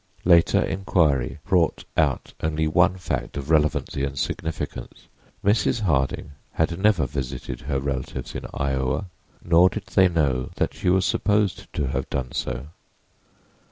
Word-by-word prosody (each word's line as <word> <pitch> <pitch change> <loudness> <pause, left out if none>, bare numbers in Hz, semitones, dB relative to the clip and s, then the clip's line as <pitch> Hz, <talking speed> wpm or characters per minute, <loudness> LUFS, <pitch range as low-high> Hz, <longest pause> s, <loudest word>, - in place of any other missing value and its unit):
Later 85 -1 +5
inquiry 80 -9 +1
brought 90 -3 +2
out - - 0
only 80 0 0
one 85 +4 +3
fact 90 - -3
of 70 +2 -4
relevancy 75 -2 +1
and 70 -1 -3
significance: 75 -5 -4 0.4
Mrs. 110 +2 +2
Harding 70 - 0 0.2
had 85 +2 0
never 100 -7 +3
visited 65 0 -5
her 70 -1 -2
relatives 65 -2 -4
in - - -5
Iowa, 70 +6 -1 0.3
nor 85 +2 +6
did 105 0 -6
they 95 -2 +6
know 70 -7 0
that - - -1
she 90 - -1
was 95 +1 +3
supposed 105 -3 0
to 75 - -1
have 65 0 -3
done 65 -2 -3
so. 70 +3 -4
80 Hz, 140 wpm, -24 LUFS, 70-90 Hz, 0.4 s, nor